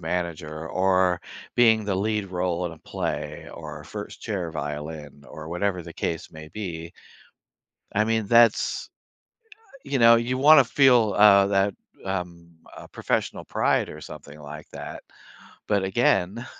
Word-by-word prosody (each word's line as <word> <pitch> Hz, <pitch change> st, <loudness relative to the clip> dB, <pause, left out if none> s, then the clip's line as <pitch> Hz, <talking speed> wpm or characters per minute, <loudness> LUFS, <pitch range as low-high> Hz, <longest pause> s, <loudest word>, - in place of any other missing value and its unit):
manager 80 Hz, -2 st, -4 dB
or 95 Hz, -1 st, +2 dB, 0.4 s
being 110 Hz, -3 st, +5 dB
the 100 Hz, -, -1 dB
lead 105 Hz, 0 st, -1 dB
role 90 Hz, -1 st, -2 dB
in 85 Hz, -, -6 dB
a 80 Hz, -, -13 dB
play -, -, -5 dB
or -, -, -9 dB
first -, -, -8 dB
chair 95 Hz, -6 st, -3 dB
violin 75 Hz, -1 st, -6 dB
or 80 Hz, 0 st, -10 dB
whatever 90 Hz, +1 st, -2 dB
the 85 Hz, 0 st, -10 dB
case 80 Hz, -, -4 dB
may 80 Hz, -1 st, -11 dB
be. 85 Hz, -3 st, -6 dB, 1.0 s
I 105 Hz, +1 st, +2 dB
mean, 110 Hz, -1 st, 0 dB
that's, 115 Hz, +1 st, +3 dB, 1.0 s
you 140 Hz, -1 st, -1 dB
know, 115 Hz, -1 st, +7 dB
you 120 Hz, +2 st, -1 dB
wanna 145 Hz, 0 st, +7 dB
feel, 120 Hz, -6 st, +4 dB
uh, 100 Hz, -1 st, +7 dB
that, 100 Hz, 0 st, +1 dB, 0.3 s
um, 85 Hz, -3 st, -5 dB, 0.2 s
uh, -, -, -10 dB
professional -, -, -2 dB
pride -, -, +1 dB
or 75 Hz, -, -9 dB
something 75 Hz, -1 st, -11 dB
like 75 Hz, +1 st, -10 dB
that. -, -, -8 dB, 0.7 s
But, 100 Hz, -2 st, +2 dB
again, 100 Hz, +2 st, +1 dB
95 Hz, 140 wpm, -25 LUFS, 80-110 Hz, 1.0 s, know